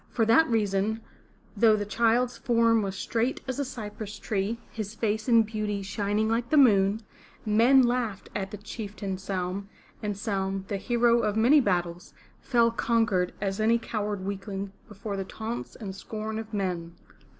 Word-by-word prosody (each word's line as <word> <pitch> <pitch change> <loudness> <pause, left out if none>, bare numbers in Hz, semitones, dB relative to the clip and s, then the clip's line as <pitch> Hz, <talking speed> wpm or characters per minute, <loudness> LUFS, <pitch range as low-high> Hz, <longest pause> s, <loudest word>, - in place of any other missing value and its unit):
For 225 - +1
that 235 +9 +5
reason, 215 0 0 0.5
though 220 +1 +5
the 205 -1 -2
child's 235 +3 +2
form 230 -2 +3
was 195 -1 -3
straight 230 +5 -1
as 260 +1 -3
a - - +1
cypress 215 -5 -7
tree, 205 +2 -2
his 215 -1 -5
face 220 +1 -1
in 230 -1 +6
beauty 210 -2 -3
shining 205 +2 -1
like 230 +2 0
the 310 - +3
moon, 210 -5 +5 0.4
men 235 +5 +5
laughed 240 -5 -1
at 195 -2 -2
the 210 - -7
Chieftain, 205 -2 -6
Saum; 190 +1 -3 0.3
and 210 -1 -2
Saum, 195 -2 -2
the 200 - -1
hero 235 +2 +3
of 215 -2 0
many 250 +7 +6
battles, 175 -5 -2 0.3
fell 235 -3 +3
conquered 225 -6 +1
as 195 0 -2
any 225 +2 +4
coward 210 -4 -3
weakling 195 0 -4 0.2
before 210 -1 -6
the 195 - -2
taunts 225 +4 -6
and 195 -4 -6
scorn 215 +2 -5
of 220 0 -8
men. 180 -5 -3
215 Hz, 160 wpm, -27 LUFS, 195-230 Hz, 0.5 s, in